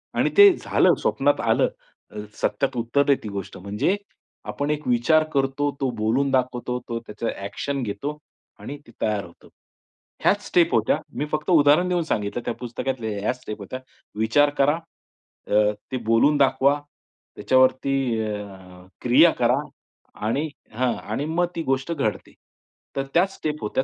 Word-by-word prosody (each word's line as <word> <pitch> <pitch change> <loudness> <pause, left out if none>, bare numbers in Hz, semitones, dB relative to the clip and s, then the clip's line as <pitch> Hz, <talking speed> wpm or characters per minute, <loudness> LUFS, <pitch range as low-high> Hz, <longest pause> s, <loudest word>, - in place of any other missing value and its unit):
आणि - - +2
ते 405 0 +10
झालं. - - +3
स्वप्नात - - +1
आलं. - - +3 0.4
अ, 105 - -10 0.2
सत्यात 135 -2 0
उतरली 140 +5 +2
ती 110 - -5
गोष्ट." 100 -1 -6
म्हणजे 105 - 0 0.6
आपण 145 +1 -3
एक 150 0 -3
विचार 125 +6 +3
करतो, 135 +1 +1
तो 135 - +1
बोलून 120 +6 +1
दाखवतो, 125 -1 0
तो 115 0 -2
त्याचा 115 0 -6 0.2
ॲक्शन 135 +8 -3
घेतो 120 +8 -4 0.4
आणि 145 - -7
ते - - -14
तयार 105 -2 0
होतो. 85 - -18 0.7
ह्याच 205 +1 +2
स्टेप 175 -2 +3
होत्या. 110 -1 +2 0.2
मी 145 - -1
फक्त 155 +2 -2
उदाहरण 155 +2 +5
देऊन 175 -1 +1
सांगितलं 110 -5 -2
त्या - - -1
पुस्तकातल्या 125 -1 -4
ह्याच 125 +5 -2
स्टेप 105 -3 -7
होत्या. 115 +6 -6 0.4
विचार 110 +7 +4
करा, 140 +2 +4 0.7
अ, 105 0 +3 0.2
ते 130 - -1
बोलून 115 +7 +4
दाखवा, 140 +1 +3 0.6
त्याच्यावरती 130 +1 +2 0.3
अ, 95 -4 -8
क्रिया 140 +8 +6
करा 120 +1 +3 0.7
आणि 140 +8 0 0.3
हां. 125 +1 +1
आणि 110 +7 -4
मग 170 +3 0
ती 165 - -2
गोष्ट 135 +2 -1
घडते. 135 -9 -3 0.6
तर 135 - -1
त्याच 190 +3 +3
स्टेप 150 -1 -4
होत्या. 105 +5 0
130 Hz, 150 wpm, -23 LUFS, 110-145 Hz, 0.7 s, ते